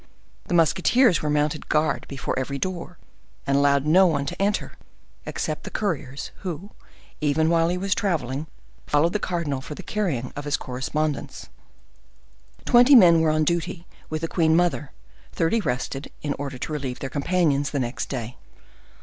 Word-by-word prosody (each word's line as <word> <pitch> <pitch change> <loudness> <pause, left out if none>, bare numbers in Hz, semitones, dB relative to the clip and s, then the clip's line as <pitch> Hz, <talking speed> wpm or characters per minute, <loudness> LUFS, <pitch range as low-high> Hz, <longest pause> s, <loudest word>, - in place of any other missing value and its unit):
The 175 - -1
musketeers 185 - +4
there 150 - -2
mounted 150 +1 0
guard 155 0 +1
before 135 -2 -4
every 140 +1 -3
door, 180 +1 -4 0.5
and 140 - +1
allowed 140 0 +3
no 185 +5 +6
one 145 -4 0
to 180 +6 -5
enter, 205 +1 0 0.6
except - - -3
the - - -6
couriers, 140 -9 -3
who, 185 +1 -6 0.5
even 155 +2 +2
while 165 0 +3
he 180 - -1
was 195 +1 0
traveling, 155 - -2 0.4
followed 150 +4 +2
the 210 - 0
cardinal 160 -9 -2
for 150 - -8
the - - -9
carrying 175 - -1
on - - -10
of 145 - -6
his 145 - 0
correspondence. 145 +4 -3 1.2
Twenty 245 +3 +7
men 170 -8 +7
were 160 - +3
on 155 0 +2
duty 170 +2 -1 0.2
with 155 0 -3
the 165 - -1
queen 160 -2 +2
mother; 150 -6 +1 0.4
thirty 170 +8 +1
rested, 135 -2 -3
in 145 -1 -1
order 140 -2 -4
to 155 - -5
relieve 135 -4 -3
their 135 - -5
companions 145 -2 +1
the 145 - -2
next 120 -1 -3
day. 125 -3 -5
155 Hz, 165 wpm, -24 LUFS, 140-175 Hz, 1.2 s, Twenty